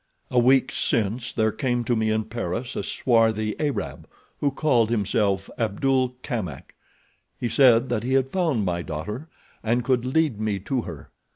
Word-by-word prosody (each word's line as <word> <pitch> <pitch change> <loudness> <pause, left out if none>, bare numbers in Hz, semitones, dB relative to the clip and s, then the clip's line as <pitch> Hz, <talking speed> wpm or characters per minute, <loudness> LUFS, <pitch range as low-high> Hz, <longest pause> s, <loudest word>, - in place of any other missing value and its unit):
"A 125 - +4
week 130 +2 +4
since 115 +2 -1
there 110 -1 +1
came 120 -2 -1
to 120 +1 +1
me 110 -1 +1
in 110 0 +1
Paris 115 +2 -4
a - - -1
swarthy 110 -3 +1
Arab, 145 -3 -3 0.3
who 145 - +2
called 130 -5 +2
himself 100 -3 +1
Abdul 125 +3 +1
Kamak. 105 - -5 0.7
He 120 - -1
said 125 -1 +5
that 120 -3 0
he 125 +3 -2
had 135 -1 +3
found 160 - +1
my 85 -1 -1
daughter 105 - -5 0.3
and 120 +2 +1
could 125 -2 +2
lead 130 -4 +1
me 105 -2 0
to 125 +5 -1
her. 80 -9 -9
120 Hz, 165 wpm, -24 LUFS, 110-130 Hz, 0.7 s, said